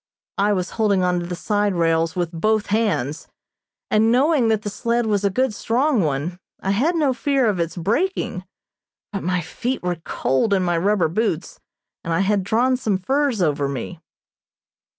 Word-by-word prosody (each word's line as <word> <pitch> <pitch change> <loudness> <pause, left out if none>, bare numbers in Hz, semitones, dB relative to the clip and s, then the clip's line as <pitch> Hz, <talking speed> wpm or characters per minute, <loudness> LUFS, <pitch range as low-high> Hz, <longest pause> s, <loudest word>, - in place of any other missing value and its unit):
I 205 +1 +3
was 185 -2 -2
holding 200 -3 +3
to 180 -1 0
the 180 - -4
side 205 +1 0
rails 165 -1 +1
with 175 -2 -1
both 215 +5 +1
hands, 165 - 0 0.6
and 220 +1 +4
knowing 270 0 +3
that 220 -1 +1
the 205 - -2
sled 235 +2 0
was 205 -2 0
a 200 - +3
good, 255 +4 0
strong 250 +3 +1
one, 155 +4 -2 0.2
I 195 - -1
had 280 - +1
no 295 -5 +2
fear 275 0 +1
of 200 -4 0
its 170 +1 -2
breaking, 220 - -1 0.7
but 195 - -2
my 180 0 0
feet 240 +11 -4
were 175 -2 -2
cold 170 +11 +1
in 190 - +1
my 175 -2 +1
rubber 200 -1 +2
boots, 180 -1 -2 0.4
and 165 - -4
I 165 +3 +2
had 195 0 +1
drawn 245 +6 +2
some 215 -6 0
furs 265 +1 0
over 145 -3 0
me. 140 +5 -6
200 Hz, 175 wpm, -22 LUFS, 175-230 Hz, 0.7 s, and